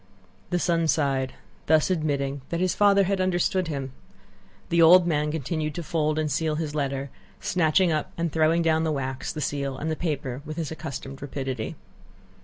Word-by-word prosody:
The 180 - +1
son 170 -2 +1
sighed, 135 -4 +1 0.3
thus 160 +3 +4
admitting 140 -5 -1
that 170 - -2
his 185 -1 +1
father 200 -1 +5
had 195 0 0
understood 185 0 +1
him. 135 -4 -4 0.8
The 170 0 +3
old 175 +2 +8
man 150 -3 +1
continued 155 0 -2
to 170 - -4
fold 155 -1 0
and 155 -1 0
seal 155 +2 0
his 155 -2 -3
letter, 140 -2 -2 0.3
snatching 175 +1 +2
up 155 -1 -1
and 170 -1 -1
throwing 160 +2 +3
down 160 -1 +2
the 160 - 0
wax, 135 -2 -3
the 155 - -5
seal, 140 -1 -2
and 160 +3 -2
the - - 0
paper, 145 -6 -3
with 155 +1 -7
his 160 -3 -3
accustomed 140 -4 -7
rapidity. 135 +1 -4
155 Hz, 180 wpm, -26 LUFS, 140-170 Hz, 0.8 s, old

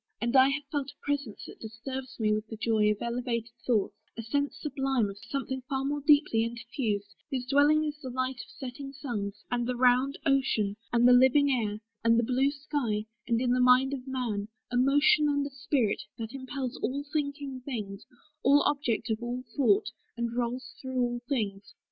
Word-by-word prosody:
And 235 +3 -1
I 260 +1 +7
have 290 +1 -1
felt 285 -3 -2
A - - -16
presence 285 -7 -2
that - - -11
disturbs 260 +4 -7
me 215 -1 +2
with 215 +1 -2
the 220 - -7
joy 215 -1 +2
Of 210 -1 -1
elevated 235 -1 -2 0.2
thoughts; 215 -5 +2 0.2
a 230 - -4
sense 285 +6 -1
sublime 270 -7 0
Of 200 - -12
something 265 +4 -4
far 270 0 -1
more 290 +1 -1
deeply 285 -6 +4
interfused, 230 -3 -3 0.2
Whose 260 -3 -2
dwelling 290 +4 +4
is 295 0 -4
the 260 - -5
light 255 0 -2
of - - -17
setting 275 +1 -7
suns, 220 -8 -5
And 240 -1 0
the 250 - -1
round 255 +3 +3
ocean, 265 -8 +2 0.2
and 240 0 +5
the 250 - +8
living 265 +3 +5
air, 215 -4 -1 0.2
And 230 0 +5
the 235 - +3
blue 260 +4 +2
sky, 275 -7 -2 0.2
and 230 -2 +2
in 245 0 +1
the 250 - +3
mind 250 +2 +5
of 265 -1 -6
man, 235 -6 -2 0.2
A - - -2
motion 285 +4 +4
and 285 -1 +1
a 280 - -5
spirit, 270 -4 0 0.2
that 225 +1 -6
impels 260 -1 -4
All 280 +2 -2
thinking 285 -3 -2
things, 210 -7 -5 0.4
all 285 +2 +5
objects 250 -7 0
of 220 +1 -1
all 245 +1 -3
thought, 225 -5 +3 0.3
And 235 0 -2
rolls 250 +1 -2
through 260 -1 -3
all 240 -1 0
things. 200 -7 -2
250 Hz, 190 wpm, -29 LUFS, 230-275 Hz, 0.4 s, the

